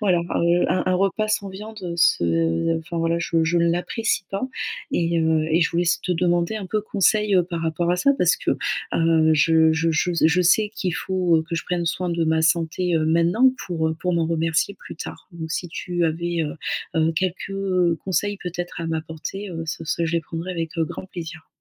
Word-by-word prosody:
Voilà, 190 -5 +3
heu, 170 0 +1
un 185 - +1
un 185 - +2
repas 195 +3 +1
sans 200 -2 0
viande, 210 +3 -9
heu, 175 -2 -4
ce 85 - +2
enfin, 170 +1 -5
voilà, 165 0 +1
je 165 -1 +1
je 170 +2 +1
ne 170 0 +3
l'apprécie 195 +5 -1
pas. 195 +3 -3 0.5
Et 170 -1 +1
heu 160 -1 +2
et 165 +2 +3
je 165 - +2
voulais 170 +1 +1
s 175 - +1
te 180 - 0
demander 175 +3 +1
un 200 - -5
peu 215 +3 -1
conseil, 210 0 +2
heu, 180 - +5
par 170 -1 -4
rapport 165 +1 0
à - - +1
ça. 280 +10 +3
Parce - - +4
que, - - -2 0.4
heu, 165 -1 +3
je 160 +1 +4
je 165 +1 +1
je 165 +3 +1
s 170 - +1
je 165 +3 +3
sais 205 +4 +3
qu'il 180 -5 -2
faut, 180 -2 +1
heu, 160 - -2
que 170 - -3
je 165 - -3
prenne 175 -1 -2
soin 180 +1 -1
de 170 -1 0
ma 160 0 +2
santé, 170 +2 +1
heu, 155 - +1
maintenant 170 +3 +2 0.3
pour, 160 -3 -1
heu, 160 - -2
pour 180 - 0
m'en 165 -1 +1
remercier 165 +3 0
plus - - -11
tard. - - -8
Donc 160 -1 -7
si 175 +2 -3
tu 175 +1 -2
avais, 170 +1 -2
heu 150 -1 -3 0.4
heu, 160 0 +2
quelques 185 0 0
conseils 200 +2 0
peut-être 175 -1 -5
à 165 - -3
m'apporter, 160 +5 -5
heu, 165 -2 -5
ce 160 +1 -4
ce 165 +2 -1
je 160 - -3
les 170 - +2
prendrai 165 +3 -5
avec, 165 -2 -4
heu, 165 - +3
grand 185 - -7
plaisir. 165 -3 -8
170 Hz, 225 wpm, -23 LUFS, 160-180 Hz, 0.5 s, heu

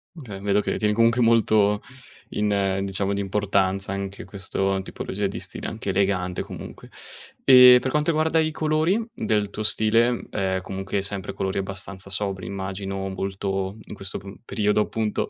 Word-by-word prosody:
Okay, 115 - -8
vedo 100 0 +2
che - - -1
tieni 105 0 +1
comunque 115 +2 +3
molto 110 -3 +3 0.5
in 100 -2 0
diciamo 100 0 -1
di 100 - -1
importanza 100 -1 0
anche 100 0 -5
questo 95 -1 -2
tipologia 100 +2 -3
di - - -5
stile, - - -6
anche 110 -2 -5
elegante 95 -2 0
comunque. - - -9 0.5
E 125 -1 +9
per 130 - -2
quanto 150 +2 +1
riguarda 160 0 +2
i 155 0 +2
colori 160 +7 +1
del 105 -2 0
tuo 105 - -5
stile, 115 +3 +2
ehm, 95 -2 -1
comunque 95 +1 -3
sempre 100 -1 -3
colori 95 0 -2
abbastanza 100 0 -7
sobri 95 -1 -2
immagino, 95 0 -4
molto 95 +1 -3
in - - -10
questo 100 -2 -5
p 100 0 -10
periodo 105 -1 +1
appunto 110 -1 -1
100 Hz, 155 wpm, -24 LUFS, 95-110 Hz, 0.5 s, E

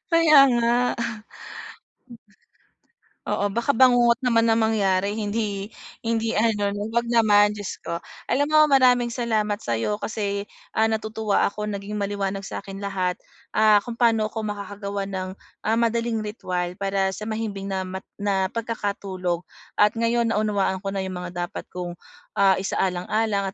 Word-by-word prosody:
Kaya 320 -4 +7 0.2
nga. 235 0 +2 2.5
Oo 205 - -1
baka 235 +4 0
bangungot 245 -2 +5
naman 230 -3 +2
ang 225 - +3
mangyari 200 -2 +1
hindi 205 -1 -2 0.3
hindi 225 0 0
ano 205 -2 +1
'no 205 +2 -4
'wag 235 +1 0
naman 210 -3 +4
Diyos 205 -2 -6
ko. 170 +2 -5 0.2
Alam 285 +4 +1
mo 310 0 +6
maraming 250 -4 +4
salamat 215 -3 -1
sayo 115 - -1
kasi, 200 -2 -2 0.3
ah, 220 0 +3
natutuwa 220 -1 0
ako 210 +1 -3
naging 200 +1 -5
maliwanag 200 -1 -2
sakin 195 0 -7
lahat, 185 -2 -1 0.4
ah, 215 -1 +6
kung 240 - -4
paano 225 -2 +3
ko 220 0 -5
makakagawa 200 -1 -4
ng, 190 -1 -4 0.3
ah, 220 +1 +1
madaling 230 0 +1
ritwal 180 -4 -3
para 195 -1 -1
sa 210 - -8
mahimbing 205 -3 -4
na 190 -1 -2
ma 190 +1 -6 0.2
na 195 -2 0
pagkakatulog 200 -6 -3 0.3
at 210 0 +5
ngayon 230 0 +1
naunawaan 205 -2 0
ko 195 - -2
na 195 - -3
yung 185 - -5
mga 175 0 -4
dapat - - -7
kong, 175 -1 -5 0.4
ah, 195 -1 +4
isaalang-alang 195 +2 0
210 Hz, 145 wpm, -24 LUFS, 195-230 Hz, 2.5 s, Kaya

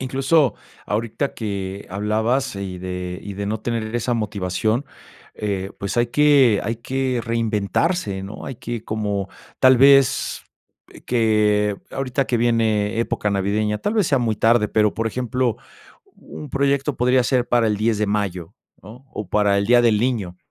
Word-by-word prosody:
Incluso 135 +1 +2 0.3
ahorita 115 +6 -2
que 100 -2 -5
hablabas 110 +6 -1
y 95 -2 -5
de 90 0 -5
y 100 - -7
de 100 +1 -4
no 105 +1 -2
tener 115 -1 -3
esa 120 +1 -1
motivación, 110 +2 -1 0.5
eh, 100 -2 -3
pues, 100 +2 -4
hay 120 0 +2
que 140 -6 +4
hay 115 +3 -2
que 130 +1 -2
reinventarse, 110 - -1
¿no? 100 +2 -8
Hay 135 - -6
que, 120 -2 -5
como 105 -3 -2 0.3
tal 130 0 +6
vez, 135 -1 +4 0.6
que 105 -3 +2 0.2
ahorita 135 0 -1
que 120 - 0
viene 115 -3 +1
época 105 -2 -1
navideña, 105 +2 0
tal 205 - -2
vez 210 -5 +2
sea 140 - +3
muy 115 -3 0
tarde, 115 0 +3
pero, 105 -1 +2
por 115 - -2
ejemplo, 125 +1 -1 0.6
un 150 - -10
proyecto 140 +1 0
podría 125 +1 +3
ser 125 -1 +1
para 120 -2 +3
el 105 - 0
10 110 +1 0
de 105 - +1
mayo, 95 -5 -2 0.3
¿no?, 115 +7 -13
o 105 -4 -6
para 100 0 +2
el 100 - 0
Día 120 +2 +5
del 115 -3 +3
Niño, 110 -8 -1
110 Hz, 160 wpm, -21 LUFS, 105-125 Hz, 0.6 s, tal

